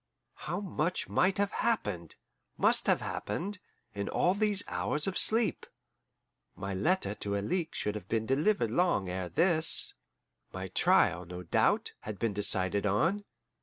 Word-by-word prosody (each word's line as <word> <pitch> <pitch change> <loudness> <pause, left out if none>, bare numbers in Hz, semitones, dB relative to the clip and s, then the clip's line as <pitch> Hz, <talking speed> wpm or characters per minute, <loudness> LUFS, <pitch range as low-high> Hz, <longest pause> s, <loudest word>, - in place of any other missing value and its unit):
How 175 - -5
much 180 -3 -2
might 185 +1 +1
have 200 0 0
happened, 105 - -2 0.4
must - - +3
have - - +3
happened, 195 +3 -4 0.3
in 100 0 -4
all 180 - +2
these 205 -1 +3
hours 150 0 -1
of 195 - -2
sleep! 225 0 +2 0.9
My 100 0 -5
letter 105 - 0
to 100 -1 -4
Alixe 165 - -2
should 105 - -2
have 105 -3 -8
been 110 -1 0
delivered 135 - +1
long 145 - +1
ere 90 0 -4
this; 165 - +4 0.6
my 95 0 -6
trial, 90 0 +2
no 90 +1 -8
doubt, - - +1
had 105 -2 -7
been 115 -1 -1
decided 100 0 +1
on. 170 - 0
120 Hz, 145 wpm, -30 LUFS, -, 0.9 s, this